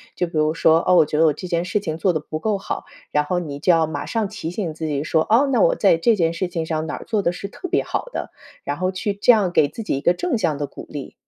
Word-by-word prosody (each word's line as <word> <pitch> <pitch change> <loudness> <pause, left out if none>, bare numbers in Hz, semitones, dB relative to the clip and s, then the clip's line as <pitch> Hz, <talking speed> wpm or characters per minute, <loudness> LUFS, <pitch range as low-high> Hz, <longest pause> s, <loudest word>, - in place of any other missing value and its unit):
就 180 - 0
比 170 - -12
如 155 0 +2
说， 165 0 +4
哦， 185 - +5
我 165 - +6
觉 150 0 -2
得 165 - +6
我 150 - +3
这 180 - -7
件 170 -1 0
事 185 +4 -1
情 160 -6 -4
做 185 - +3
得 160 - -1
不 155 +1 -6
够 210 +3 0
好， 195 - -5 0.3
然 150 - +2
后 180 +5 -1
你 145 -5 -6
就 180 - +3
要 165 -2 +4
马 150 -2 -5
上 225 -3 -1
提 195 -5 -6
醒 175 -2 -3
自 160 +1 -4
己 145 -2 -1
说， 160 0 +1
哦， 240 +6 +4
那 - - +3
我 - - +4
在 165 - +4
这 225 +7 +3
件 165 -4 +1
事 180 +2 -2
情 170 -2 -3
上 160 0 -2
哪 150 - -3
儿 - - -9
做 215 -3 0
的 170 - +1
是 180 +3 -6
特 365 - -8
别 - - +1
好 - - -3
的， - - -5 0.3
然 145 - -3
后 185 +1 0
去 200 +2 -2
这 200 +5 +5
样 205 -6 +2
给 150 - +4
自 225 - -7
己 210 - -1
一 - - -4
个 175 - +3
正 350 - -1
向 160 -10 0
的 145 - -2
鼓 - - -10
励。 145 -3 -7
170 Hz, 335 characters per minute, -21 LUFS, 155-200 Hz, 0.3 s, 我